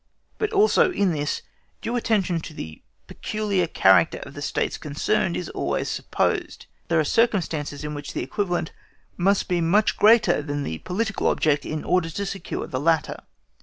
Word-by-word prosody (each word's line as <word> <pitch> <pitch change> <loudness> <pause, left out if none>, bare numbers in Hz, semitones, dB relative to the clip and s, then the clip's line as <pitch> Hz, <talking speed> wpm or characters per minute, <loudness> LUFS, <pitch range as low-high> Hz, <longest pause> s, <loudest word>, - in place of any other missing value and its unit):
But 430 0 0
also, 415 -3 +4
in 200 - +1
this, 145 -2 -2 0.4
due 235 +2 -3
attention 200 -7 +1
to 155 -1 -9
the 80 - -8 0.2
peculiar 205 -5 -1
character 95 - +4
of - - -11
the - - -8
States - - -2
concerned 85 - 0
is 90 - -4
always - - -2
supposed. - - -2 0.2
There 165 -1 +2
are - - +3
circumstances 165 -8 0
in 150 0 -4
which 145 -1 -6
the - - -2
equivalent 180 -6 -2 0.4
must 195 +3 +2
be 175 -1 0
much 200 +6 +2
greater 220 -5 +5
than 145 -1 -3
the 80 - -4
political 210 +3 -2
object, 150 -2 +1
in 155 -1 -3
order 180 -2 +1
to 200 +5 -4
secure 195 0 -4
the 130 - -4
latter. 160 +1 +1
175 Hz, 165 wpm, -24 LUFS, 150-210 Hz, 0.4 s, greater